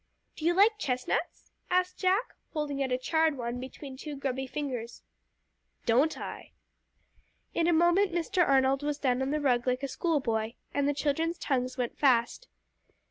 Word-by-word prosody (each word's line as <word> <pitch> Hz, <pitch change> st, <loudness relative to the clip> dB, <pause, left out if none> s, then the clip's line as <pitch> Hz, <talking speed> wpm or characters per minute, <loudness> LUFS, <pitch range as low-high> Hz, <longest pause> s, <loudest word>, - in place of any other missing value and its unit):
"Do 310 Hz, -, -6 dB
you 345 Hz, +1 st, +3 dB
like 420 Hz, +3 st, +5 dB
chestnuts?" 250 Hz, -8 st, -2 dB, 0.2 s
asked 365 Hz, 0 st, +1 dB
Jack, 385 Hz, +5 st, +1 dB, 0.2 s
holding 295 Hz, -3 st, -2 dB
out 265 Hz, -1 st, -1 dB
a 250 Hz, -, +2 dB
charred 315 Hz, +3 st, +1 dB
one 240 Hz, 0 st, -3 dB
between 265 Hz, +1 st, -8 dB
two 295 Hz, +1 st, -6 dB
grubby 265 Hz, -1 st, -3 dB
fingers. 250 Hz, -5 st, -5 dB, 0.8 s
"Don't 265 Hz, +7 st, +3 dB
I?" -, -, -8 dB, 1.0 s
In 335 Hz, -, +1 dB
a -, -, +4 dB
moment 345 Hz, +4 st, +4 dB
Mr. 350 Hz, +2 st, +1 dB
Arnold 270 Hz, -1 st, +3 dB
was 295 Hz, 0 st, -1 dB
down 260 Hz, -3 st, +1 dB
on 265 Hz, -, 0 dB
the 300 Hz, +1 st, 0 dB
rug 250 Hz, -4 st, +1 dB
like 255 Hz, +2 st, 0 dB
a -, -, 0 dB
school 325 Hz, +2 st, 0 dB
boy, 225 Hz, -2 st, -2 dB, 0.2 s
and 285 Hz, 0 st, +1 dB
the 290 Hz, -, 0 dB
children's 320 Hz, +4 st, 0 dB
tongues 255 Hz, -2 st, -1 dB
went 245 Hz, -2 st, -3 dB
fast. 260 Hz, -, +2 dB
280 Hz, 170 wpm, -29 LUFS, 255-330 Hz, 1.0 s, like